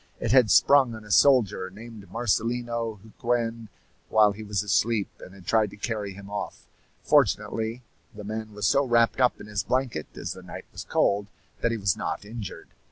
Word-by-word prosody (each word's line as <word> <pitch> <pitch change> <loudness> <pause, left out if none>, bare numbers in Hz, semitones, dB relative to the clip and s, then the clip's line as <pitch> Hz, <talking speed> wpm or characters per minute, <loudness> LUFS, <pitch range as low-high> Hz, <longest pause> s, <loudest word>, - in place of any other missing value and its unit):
It - - -1
had 125 -4 +6
sprung 130 +1 +5
on 110 -1 -11
a 105 - -9
soldier 105 -8 +4
named 105 0 -12
Marcelino 115 0 -1
Huquen 115 0 -2 0.4
while 105 -1 +5
he 100 +2 -9
was 105 -1 -2
asleep, 105 +1 +1
and 95 - -12
had 95 -2 -15
tried 110 +2 +2
to - - -13
carry 105 -2 -3
him 100 +1 -11
off. 100 0 -6 0.4
Fortunately, 115 +3 +1 0.3
the 105 - -10
man 110 +1 -5
was 105 -1 -3
so 140 +10 +4
wrapped 120 -1 +2
up 125 - +3
in - - -9
his 105 -2 -2
blanket, 125 - -1
as - - -5
the - - -11
night - - -9
was - - -8
cold, 100 0 +1 0.3
that 115 - +1
he 115 - -1
was 95 -4 +1
not - - -4
injured. 110 -2 -8
110 Hz, 185 wpm, -26 LUFS, 100-115 Hz, 0.4 s, had